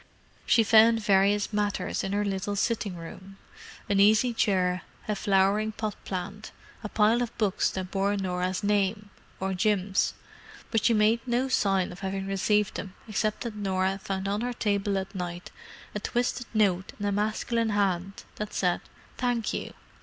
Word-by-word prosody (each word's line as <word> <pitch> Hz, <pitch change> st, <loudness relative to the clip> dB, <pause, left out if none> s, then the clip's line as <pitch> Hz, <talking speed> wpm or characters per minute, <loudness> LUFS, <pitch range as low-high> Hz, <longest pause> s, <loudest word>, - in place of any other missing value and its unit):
She 230 Hz, -, +5 dB
found 225 Hz, +1 st, +6 dB
various 200 Hz, +1 st, +3 dB
matters 205 Hz, -1 st, -1 dB
in 195 Hz, -, -2 dB
her 205 Hz, +1 st, 0 dB
little 200 Hz, +1 st, -2 dB
sitting 205 Hz, -2 st, -1 dB
room: 190 Hz, +3 st, -10 dB, 0.5 s
an 200 Hz, -1 st, +2 dB
easy 215 Hz, +4 st, +5 dB
chair, 185 Hz, -4 st, +1 dB, 0.3 s
a 210 Hz, -, 0 dB
flowering 200 Hz, +2 st, +2 dB
pot 215 Hz, -1 st, -3 dB
plant, 195 Hz, +3 st, -5 dB, 0.3 s
a 210 Hz, -, -4 dB
pile 220 Hz, +4 st, +3 dB
of 240 Hz, -1 st, -4 dB
books 205 Hz, -4 st, +1 dB
that 185 Hz, -1 st, -5 dB
bore 200 Hz, +1 st, +1 dB
Norah's 185 Hz, -1 st, -2 dB
name—or 205 Hz, -1 st, -2 dB
Jim's; 195 Hz, 0 st, +1 dB, 0.6 s
but 225 Hz, -3 st, +1 dB
she 230 Hz, -1 st, +4 dB
made 215 Hz, +2 st, +4 dB
no 245 Hz, +2 st, +1 dB
sign 195 Hz, -7 st, +1 dB
of 180 Hz, -, -10 dB
having 195 Hz, 0 st, -3 dB
received 200 Hz, +1 st, +1 dB
them 190 Hz, -1 st, -7 dB
except 215 Hz, 0 st, -1 dB
that 235 Hz, -3 st, -4 dB
Norah 190 Hz, -1 st, 0 dB
found 190 Hz, 0 st, -3 dB
on 205 Hz, +2 st, -1 dB
her 245 Hz, +1 st, -2 dB
table 200 Hz, -3 st, 0 dB
at 190 Hz, +2 st, -4 dB
night 175 Hz, -2 st, -5 dB, 0.4 s
a 210 Hz, -, -2 dB
twisted 245 Hz, +2 st, -1 dB
note 195 Hz, -4 st, +1 dB
in 205 Hz, -, -3 dB
a 205 Hz, -, +1 dB
masculine 220 Hz, +3 st, 0 dB
hand 195 Hz, -2 st, -1 dB
that 210 Hz, 0 st, -5 dB
said 180 Hz, -2 st, +1 dB, 0.4 s
"Thank 245 Hz, -3 st, 0 dB
you. -, -, -4 dB
205 Hz, 160 wpm, -27 LUFS, 190-215 Hz, 0.6 s, found